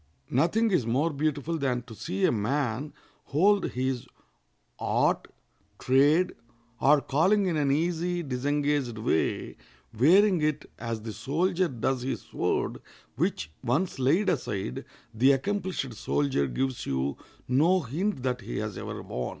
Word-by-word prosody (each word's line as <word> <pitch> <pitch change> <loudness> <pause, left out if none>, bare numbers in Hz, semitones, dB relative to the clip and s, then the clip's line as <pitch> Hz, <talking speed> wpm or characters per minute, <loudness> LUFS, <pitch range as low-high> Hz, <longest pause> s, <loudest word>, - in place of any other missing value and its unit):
Nothing 190 - +2
is 180 -9 +3
more 140 +8 +1
beautiful 155 +2 -1
than 125 -3 0
to 115 - -11
see 95 -2 -1
a - - +4
man 125 +4 -1 0.3
hold 195 +7 +3
his 130 0 -2 0.7
art, - - +1 0.5
trade, 145 +7 +3 0.5
or 145 +1 +5
calling 190 +10 +2
in 175 -3 0
an 145 -2 +1
easy, 170 +4 0
disengaged 140 -2 -1
way, 110 -7 -1 0.4
wearing 180 - +5
it 150 -1 -1
as 115 -2 -4
the 110 -1 -5
soldier 175 - 0
does 130 -1 -1
his 125 -2 -3
sword, - - -2 0.3
which, 75 - -1
once 140 +6 0
laid 160 +11 +3
aside, 100 - -2 0.3
the 130 +5 +5
accomplished 185 - -2
soldier 130 - 0
gives 130 - -2
you 65 +1 -1 0.3
no 165 +9 +3
hint 155 - -2
that 125 -2 -1
he - - -5
has - - -4
ever - - -6
worn. 60 -1 -4
140 Hz, 135 wpm, -28 LUFS, 125-165 Hz, 0.7 s, or